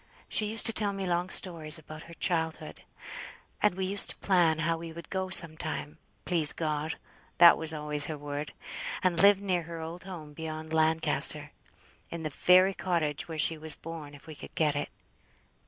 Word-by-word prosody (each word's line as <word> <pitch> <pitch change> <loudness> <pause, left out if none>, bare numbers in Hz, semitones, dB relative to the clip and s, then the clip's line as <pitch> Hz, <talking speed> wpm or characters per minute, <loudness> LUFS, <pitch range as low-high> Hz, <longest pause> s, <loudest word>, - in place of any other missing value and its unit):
She 215 - +1
used 220 +1 0
to 225 - +6
tell 205 -2 +1
me 195 -1 -4
long 175 0 -1
stories 165 -5 +2
about 155 0 -11
her 170 - -11
childhood, 160 -3 -2 0.8
and 210 -3 +2
we 190 0 -2
used 200 +2 +3
to - - +1
plan 175 -5 +2
how 165 +1 0
we 165 0 -8
would 170 +1 -11
go 190 -1 -3
sometime, 155 -3 +2 0.3
please 165 -4 +4
God 155 -1 -3 0.4
(that 170 -1 +8
was 160 -1 0
always 150 -1 -1
her 155 - -5
word), 145 0 -6 0.5
and 180 -2 +3
live 200 0 +6
near 185 -3 0
her 165 0 -8
old 165 +3 -8
home 160 -6 -9
beyond 160 0 -7
Lancaster; 155 -2 +2 0.6
in 170 -1 -7
the 155 - -4
very 185 +5 +4
cottage 165 -6 -2
where 160 -1 -7
she 160 +1 +1
was 160 0 +2
born 155 -3 -9
if 140 - -17
we 160 - -10
could - - -11
get 150 -3 +1
it. 145 - -3
160 Hz, 185 wpm, -28 LUFS, 155-180 Hz, 0.8 s, that